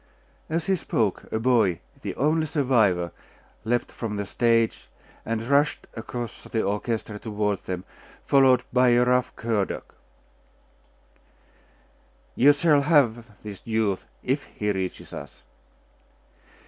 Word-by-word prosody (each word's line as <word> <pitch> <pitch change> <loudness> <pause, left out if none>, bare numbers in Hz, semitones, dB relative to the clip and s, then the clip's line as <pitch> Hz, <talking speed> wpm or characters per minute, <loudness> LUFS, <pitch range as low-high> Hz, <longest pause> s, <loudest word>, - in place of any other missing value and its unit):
As 160 +1 -1
he 195 - +2
spoke, 110 - -1
a - - 0
boy, 110 -7 +2 0.2
the - - -4
only 155 +3 +1
survivor, 110 - +2 0.5
leaped 120 +1 0
from 110 -3 -4
the 100 0 -2
stage, 115 +2 +1 0.4
and 115 0 -1
rushed 140 +2 +2
across 120 0 -6
the 110 - -1
orchestra 105 +1 -2
toward 105 -3 -1
them, 90 -1 -4 0.4
followed 130 -3 +5
by 125 0 +5
a 120 +1 +4
rough 125 0 +2
cur 115 -3 0
dog. - - -5 2.5
'You 140 +4 +7
shall 145 0 +3
have 120 -7 +1
this 105 -3 -8
youth, 110 -4 -1 0.2
if 135 +3 0
he 105 0 -2
reaches 95 -2 -4
us. - - -9
115 Hz, 120 wpm, -25 LUFS, 105-130 Hz, 2.5 s, You